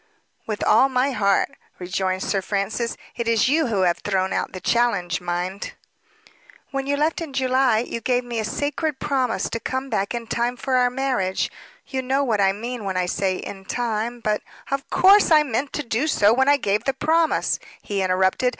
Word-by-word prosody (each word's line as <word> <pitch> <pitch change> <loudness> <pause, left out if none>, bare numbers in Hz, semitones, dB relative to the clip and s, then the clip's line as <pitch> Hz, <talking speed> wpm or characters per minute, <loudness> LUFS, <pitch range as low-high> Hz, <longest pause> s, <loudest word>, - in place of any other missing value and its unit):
"With 215 -2 -3
all 245 +6 +5
my 260 +2 +1
heart," 200 -5 +2 0.3
returned 185 +1 -2
Sir 195 - 0
Francis. 205 +4 -2 0.2
"It 235 -1 -3
is 230 +1 +3
you 310 +2 +2
who 210 -5 0
have 175 -2 +2
thrown 190 -2 -1
out - - -1
the 185 - -7
challenge, 200 -7 +1
mind." 180 +2 -3 1.0
"When 275 0 -3
you 285 0 +1
left 310 +3 0
in 315 -4 -6
July 260 -3 +2
you 235 -1 -5
gave 250 +1 +1
me 240 -2 -4
a - - -1
sacred 290 +5 -2
promise 260 -4 0
to 230 - -2
come 260 +2 -4
back 200 +1 -1
in 235 -1 -4
time 240 +2 -1
for 260 0 -1
our 250 0 +4
marriage; 250 -8 -1 0.3
you 265 - -3
know 265 +2 +1
what 220 -6 +1
I 195 -1 +4
mean 235 +3 -5
when 190 -2 -2
I 180 - +1
say 185 +1 0
'in 195 +1 -7
time,' 235 +1 -2
but 210 -1 0 0.2
" - - -18
"Of 275 0 -2
course 395 +2 +6
I 310 -2 +6
meant 270 +1 -2
to 295 - -2
do 240 +4 -1
so 215 -7 +4
when 265 +3 +3
I 285 - +5
gave 210 -5 -1
the 270 - +1
promise," 325 +3 +1 0.2
he 200 -1 -2
interrupted. 190 +6 +2
235 Hz, 200 wpm, -23 LUFS, 200-270 Hz, 1.0 s, course